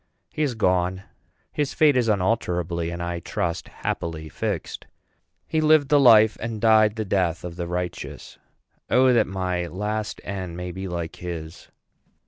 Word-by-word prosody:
He - - -3
is 140 -5 0
gone. 95 -2 +1 0.5
His 145 -2 -2
fate 150 -3 +5
is 125 -2 +2
unalterably, 90 -5 0
and 85 0 -5
I 85 0 -3
trust 85 0 -3
happily, 80 -2 -4
fixed. - - -4 0.6
He 160 - 0
lived 155 -2 +4
the 145 - +5
life, 110 -5 +6
and 110 -1 -4
died 110 -1 +4
the 110 -1 -3
death, 90 -4 0
of 90 -1 -6
the 85 -1 -4
righteous. 90 0 -5 0.5
O 130 0 +5
that 120 - +3
my 90 -2 -2
last 105 +4 -3
end 95 -4 -5
may 90 0 -5
be 95 +2 -6
like 85 -2 -5
his! 85 -2 -7
95 Hz, 155 wpm, -24 LUFS, 85-110 Hz, 0.6 s, life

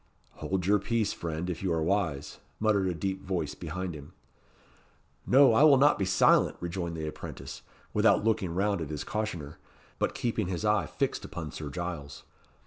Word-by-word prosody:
"Hold 95 -2 -2
your 105 +2 +4
peace, 115 0 0
friend, 80 +1 -4
if 90 -3 -4
you 95 -2 -1
are 80 -1 +1
wise," 80 -6 -1 0.2
muttered 105 -3 +2
a 90 - 0
deep 95 +3 -3
voice 90 -5 -2
behind 90 +2 -5
him. 75 -1 -11 1.1
"No, 135 -1 +6
I 110 - +4
will 150 -3 +8
not 145 -2 +4
be 95 - +1
silent," 95 +1 +4
rejoined 85 -1 -4
the 80 - -3
apprentice, 75 - -8 0.3
without - - +4
looking 100 -6 0
round 100 -1 +1
at 80 - -4
his 75 -2 -4
cautioner, 85 -9 -4 0.4
but - - 0
keeping 115 -5 -1
his 95 +3 -3
eye 105 -6 +2
fixed - - -2
upon - - -6
Sir 75 -2 -6
Giles. 80 -4 -6
90 Hz, 175 wpm, -29 LUFS, 80-105 Hz, 1.1 s, will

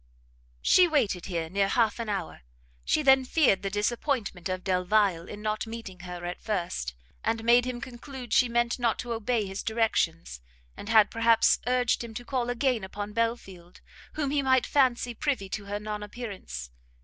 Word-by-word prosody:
She 365 -1 +6
waited 235 - 0
here 170 -3 -2
near 195 +3 +1
half 225 +1 +1
an 230 -2 -3
hour. 200 -2 -4 0.4
She 305 - +1
then 265 -1 +6
feared 255 -8 +3
the 200 - -2
disappointment 210 - -1
of 185 0 -3
Delvile 185 -1 +1
in 210 0 -8
not 215 +1 -2
meeting 225 -5 -8
her 180 -1 -7
at 175 0 -5
first, 175 - -3 0.3
had 225 0 -1
made 240 +1 +5
him 250 -1 -4
conclude 255 -1 -8
she 250 - +4
meant 240 +1 +1
not 235 -2 +1
to 240 -1 -4
obey 225 -1 0
his 195 0 -5
directions, 175 - -1 0.3
and 205 - -8
had 220 -2 +5
perhaps 230 0 +4
urged 250 -1 +1
him 225 -1 -9
to 245 - -6
call 245 -1 -1
again 245 -2 0
upon 205 +2 -6
Belfield, 195 -6 -3 0.3
whom 285 -3 -2
he 290 -1 +2
might 260 -2 +3
fancy 245 -3 +2
privy 255 -5 -1
to 205 +1 -5
her 205 +1 -3
non 210 0 -5
appearance. 200 - -7
225 Hz, 175 wpm, -28 LUFS, 195-245 Hz, 0.4 s, She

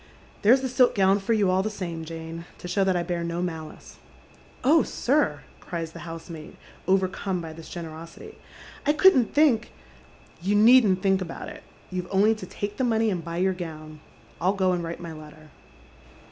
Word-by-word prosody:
There's 245 +6 +5
the 265 - -1
silk 250 0 +3
gown 195 0 +4
for 205 +4 0
you 205 -4 +3
all 185 +1 +3
the 215 - -2
same, 170 -6 -5
Jane, 165 +1 -7
to - - -8
show 185 +2 +1
that 190 -1 +2
I 175 - 0
bear 170 -1 -2
no 170 +1 -2
malice." 160 -3 -7 0.3
" - - -25 0.3
Oh, 300 +5 +5
sir! 250 - 0
" - - -27
cries 165 -2 -5
the - - -10
housemaid, 165 -1 -9 0.3
overcome 190 0 +1
by 165 -2 -7
this 165 0 -11
generosity, 165 -1 -9 0.5
"Icouldn'think 295 - +4 0.3
" - - -25
" - - -27
You 195 +4 +1
needn't 215 -4 +6
think 195 -1 +3
about 175 - -6
it. 300 0 -10 0.3
You've 180 -1 -3
only 200 +3 +4
to 220 - -8
take 205 0 -5
the 260 - 0
money 225 -2 +2
and 175 -3 -3
buy 170 +1 -5
your 190 +1 +2
gown. 155 -3 -8 0.4
I'll 185 +3 +3
go 190 -2 +1
and 175 -1 -2
write 165 0 -5
my 170 -2 -7
letter." 155 0 -13
185 Hz, 190 wpm, -26 LUFS, 165-215 Hz, 0.5 s, needn't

